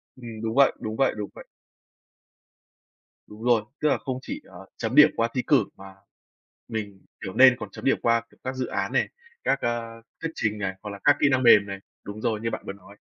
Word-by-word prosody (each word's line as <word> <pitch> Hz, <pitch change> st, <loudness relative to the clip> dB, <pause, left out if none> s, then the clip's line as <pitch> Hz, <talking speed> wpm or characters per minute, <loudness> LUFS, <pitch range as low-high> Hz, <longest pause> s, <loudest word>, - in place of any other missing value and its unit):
Ừm, 115 Hz, -3 st, -9 dB
đúng 110 Hz, 0 st, -3 dB
vậy, 140 Hz, 0 st, +6 dB
đúng 110 Hz, 0 st, -4 dB
vậy, 135 Hz, +1 st, +2 dB
đúng 105 Hz, -1 st, -4 dB
vậy. -, -, -11 dB, 1.8 s
Đúng 105 Hz, +2 st, -12 dB
rồi, 120 Hz, -2 st, +4 dB, 0.2 s
tức 150 Hz, -, +3 dB
là -, -, +2 dB
không 130 Hz, -1 st, -4 dB
chỉ, -, -, -6 dB
ờ, 95 Hz, +1 st, -12 dB
chấm 115 Hz, +3 st, -3 dB
điểm 150 Hz, +1 st, +9 dB
qua 115 Hz, -, +1 dB
thi 125 Hz, -, 0 dB
cử 140 Hz, -8 st, +5 dB
mà 95 Hz, 0 st, -12 dB, 0.7 s
mình, 105 Hz, -3 st, -6 dB, 0.2 s
kiểu, 95 Hz, -, -5 dB
nên 130 Hz, +1 st, +7 dB
còn -, -, -6 dB
chấm -, -, -10 dB
điểm 135 Hz, -, +3 dB
qua, 115 Hz, 0 st, +3 dB
kiểu, -, -, -23 dB
các 130 Hz, 0 st, -4 dB
dự 130 Hz, -1 st, -2 dB
án -, -, -2 dB
này, -, -, +2 dB, 0.3 s
các, 135 Hz, -, +1 dB
ơ, 115 Hz, -1 st, -3 dB, 0.2 s
thuyết 165 Hz, -, -3 dB
trình 105 Hz, -1 st, -1 dB
này, 95 Hz, -2 st, -2 dB
hoặc 105 Hz, -, -5 dB
là 100 Hz, -1 st, -8 dB
các 145 Hz, -, +6 dB
kỹ 145 Hz, -, +5 dB
năng 130 Hz, -1 st, +2 dB
mềm 105 Hz, -4 st, +7 dB
này. 100 Hz, -1 st, -6 dB, 0.2 s
Đúng 105 Hz, +1 st, -8 dB
rồi, 110 Hz, -1 st, 0 dB
như 115 Hz, -, -1 dB
bạn -, -, -5 dB
vừa -, -, -4 dB
nói. 100 Hz, 0 st, -16 dB
115 Hz, 230 wpm, -25 LUFS, 105-130 Hz, 1.8 s, điểm